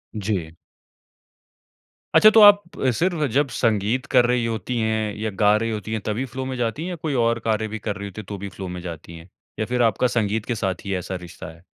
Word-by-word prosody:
जी। 95 -6 -2 1.6
अच्छा 215 - +9
तो 220 - +5
आप 205 -1 +9 0.4
सिर्फ़ 175 -3 +1
जब 140 +1 +2
संगीत 115 +4 +1
कर 125 - +6
रही 120 -1 +1
होती 115 +2 -3
हैं 110 -2 -1
या 110 +1 -2
गा 105 0 +5
रही 115 +1 -2
होती 110 +1 -4
है 110 - -1
तभी 110 +5 -2
फ़्लो 130 0 -4
में 130 0 -4
जाती 120 +6 -2
हैं 180 - -4
या 180 - -4
कोई 155 -3 -2
और 115 0 +1
कार्य 110 0 +1
भी 110 +1 -6
कर 105 0 -3
रही 100 +1 -6
होती 100 +2 -8
है - - -16
तो 100 - -5
भी 100 +1 -6
फ़्लो 95 -1 -7
में 90 0 -6
जाती 85 -1 -8
हैं? 85 +3 -14 0.3
या 110 - 0
फ़िर 125 +1 -1
आपका 115 +3 +2
संगीत 110 0 0
के 120 - -2
साथ 95 -4 -3
ही 100 - -2
ऐसा 90 +1 -4
रिश्ता 90 -2 -9
है? 85 - -20
110 Hz, 235 wpm, -23 LUFS, 100-125 Hz, 1.6 s, अच्छा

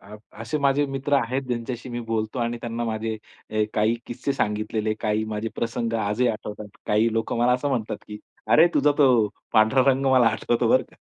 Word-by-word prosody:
अ, 105 +2 -12 0.2
असे 115 +6 -2
माझे 140 0 +2
मित्र 135 +1 -1
आहेत 130 0 0
ज्यांच्याशी 120 +1 -4
मी 120 0 -4
बोलतो 110 +2 -2
आणि 120 0 -1
त्यांना 120 0 -3
माझे 110 0 -2 0.4
हे 110 0 +1
काही 110 +2 +2
किस्से 125 +3 -3
सांगितलेले 110 -2 -1
काही 110 -1 0
माझे 110 +1 -3
प्रसंग 115 0 -2
आजही 105 +4 +1
आठवतात. 105 -1 -5 0.2
काही 110 +2 +2
लोकं 115 +1 -1
मला 120 +1 +3
असं 130 +3 0
म्हणतात, 120 -6 -2
की 105 0 -8 0.3
अरे, 160 - +7
तुझा 145 +1 +4
तो 125 -7 +5 0.2
पांढरा 110 +5 +4
रंग 135 +1 0
मला 130 -2 +5
आठवतो 115 +1 0
बरं - - +4
का. - - -22
115 Hz, 190 wpm, -24 LUFS, 110-130 Hz, 0.4 s, अरे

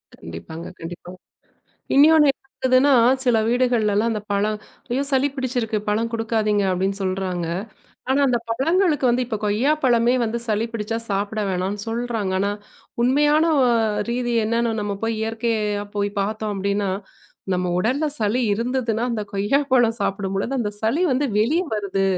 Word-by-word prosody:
கண்டிப்பாங்க, 160 - -9
கண்டிப்பா. 175 +1 -8 0.8
இன்னொன்னு 300 +1 +6 0.4
என்னதுன்னா, 260 +2 +4 0.3
சில 245 -3 +3
வீடுகள்ல 240 -3 +2
எல்லாம் 220 +3 +2
அந்தப் 215 -1 -6
பழம், 210 +2 0 0.3
"ஐயோ! 260 +3 0
சளி 270 +1 +2
பிடிச்சிருக்கு 245 -4 -1
பழம் 225 +2 0
குடுக்காதீங்க" 220 -2 0
அப்படின்னு 190 +2 0
சொல்றாங்க. 185 -2 -2 0.6
ஆனா 270 +2 +3
அந்தப் 240 -3 0
பழங்களுக்கு 310 +5 +1
வந்து 250 +1 +1
இப்ப 225 -2 -3
கொய்யாப்பழமே 245 +2 +2
வந்து 230 +1 -2
சளி 215 +1 0
பிடிச்சா 225 0 -3
சாப்பிட 205 +2 -1
வேணாம்னு 190 +2 -2
சொல்றாங்க. 225 -4 -2
ஆனா 200 +1 +1 0.5
உண்மையான 295 +5 +3 0.7
ரீதி 240 0 -1
என்னன்னு 230 +1 0
நம்ம 205 -1 -2
போய்க் 225 -1 -1
இயற்கையா 220 -2 -1
போய்ப் 205 0 -2
பார்த்தோம் 215 +1 -2
அப்படின்னா, 200 0 -1 0.6
நம்ம 180 0 0
உடல்ல 255 +11 0
சளி 215 +4 +1
இருந்ததுன்னா 235 0 -1
அந்தக் 210 -3 -4
கொய்யாப்பழம் 240 +3 +2
சாப்பிடும்போது 195 +3 -2
அந்த 215 -4 -1
சளி 230 +9 +1
வந்து 265 +3 +1
வெளிய 290 +12 +2
வருது 200 -2 -1
225 Hz, 135 wpm, -22 LUFS, 205-250 Hz, 0.8 s, இன்னொன்னு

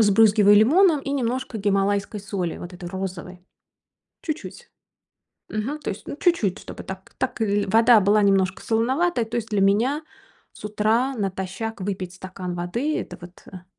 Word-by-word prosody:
Сбрызгиваю 205 -1 +5
лимоном 305 - +5
и 275 - -5
немножко 255 -3 -2
гималайской 200 +1 0
соли, 190 -4 -3
вот 175 - -8
этой 175 -1 -8
розовой, 185 -1 -6 0.8
чуть-чуть. 330 +9 -6 0.8
Мгм, 250 +8 -3
то - - -5
есть, - - -7
ну, - - -5
чуть-чуть, 335 - +1
чтобы - - -9
так 190 0 -9
так 260 -2 -3
ль 205 -1 +1
вода 225 +2 +6
была 205 +2 +3
немножко 195 -1 +2
солоноватой. 250 +5 +1
То 230 +2 -4
есть 225 -1 -4
для 205 -2 +1
меня 235 +10 +2 0.5
с - - -15
утра 220 +5 +1
натощак 195 +2 -4
выпить 185 -2 -4
стакан 185 -1 -7
воды- 230 - -2
это 180 - -7
вот, 175 +1 -13
а 185 -1 -11
205 Hz, 155 wpm, -23 LUFS, 190-240 Hz, 0.8 s, вода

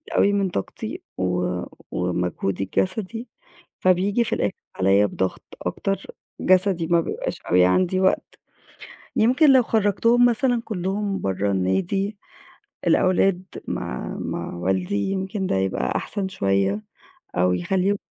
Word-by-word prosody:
أوي 200 - +4
من 200 -2 +1
طاقتي 100 - -5 0.2
و 90 -1 0 0.4
ومجهودي 90 +1 -1
الجَسدي، 205 - -2 0.5
فبييجي 190 +5 +3
في - - -2
الآخِر 100 - 0 0.3
عليّا 95 +2 +4
بضغط 95 -2 -2 0.2
أكتر 195 - -2 0.4
جَسدي 185 -3 +3
ما 170 -1 +4
بيبقاش - - -4
أوي 90 0 +4
عندي 185 - +2
وقت. 190 - 0 0.8
يمكن 255 +7 +5
لو 260 -2 +6
خرَّجتهم 230 +3 +3
مثلًا 245 0 +2
كلّهم 195 0 -2
برّه 95 +1 0
النادي 170 - 0 0.7
الأولاد 185 0 +3 0.2
مع - - -4
مع - - -4
والدي، 95 - -1
يمكن 190 +1 -2
ده - - 0
يبقى 95 0 0
أحسن 200 -2 -2
شوية 100 - 0 0.5
أو 90 +1 +3
يخلّيهم 190 - +1
185 Hz, 120 wpm, -23 LUFS, -, 0.8 s, لو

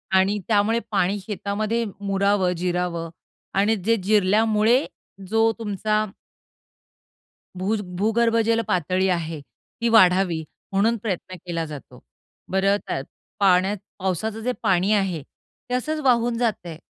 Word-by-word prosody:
आणि 190 +2 +3
त्यामुळे 220 +1 +2
पाणी 200 0 +1
शेतामध्ये 210 +3 -2 0.2
मुरावं, 200 -1 +1
जिरावं 175 -1 -2 0.4
आणि 205 +3 +3
जे 220 +3 +1
जिरल्यामुळे 215 +4 +3 0.4
जो 225 +3 +3
तुमचा 215 0 0 1.5
भुज 205 +4 -1 0.2
भूगर्भजल 230 +1 +2
पातळी 185 +2 +1
आहे, 165 -3 -2 0.4
ती 235 - +2
वाढावी 185 -6 +4 0.3
म्हणून 215 +4 +2
प्रयत्न 185 -3 -3
केला 170 -2 -2
जातो. 150 -3 -10 0.5
बरं 195 +1 +3
त्यात 135 - -2 0.4
पाण्यात 190 +1 +3 0.2
पावसाचं 195 +4 -2
जे 250 - +1
पाणी 185 +2 +2
आहे, 190 -6 0
ते 250 - -14
असच 310 +5 -2
वाहून 240 -2 +2
जातं 230 -7 -1
आहे. 160 - -7
200 Hz, 115 wpm, -23 LUFS, 185-225 Hz, 1.5 s, वाढावी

